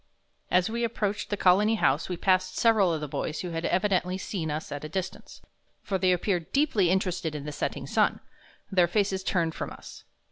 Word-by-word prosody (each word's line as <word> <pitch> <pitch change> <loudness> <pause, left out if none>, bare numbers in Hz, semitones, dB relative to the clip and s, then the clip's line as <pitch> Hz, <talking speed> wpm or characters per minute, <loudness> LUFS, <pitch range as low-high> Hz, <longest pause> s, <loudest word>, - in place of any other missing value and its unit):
As 180 0 +3
we 235 +2 -2
approached 210 -3 -2
the 205 - -1
Colony 205 +5 +4
House 150 -7 +1
we 180 - -3
passed 185 0 +1
several 220 -6 +4
of 160 -2 -2
the 150 - -3
boys 150 +2 -3
who 180 - -5
had 165 0 -3
evidently 185 -1 +1
seen 180 -4 -4
us 150 +1 -4
at 145 0 -5
a 155 - -5
distance, 185 +3 -6 0.4
for 190 -2 -1
they 185 -1 +3
appeared 180 -1 -1
deeply 250 - +2
interested 180 -4 0
in 145 -1 -5
the 150 - -4
setting 145 - -3
sun, - - +1 0.5
their 180 -3 +4
faces 195 0 0
turned 170 -4 0
from - - -4
us. - - -11
185 Hz, 200 wpm, -27 LUFS, 165-200 Hz, 0.5 s, Colony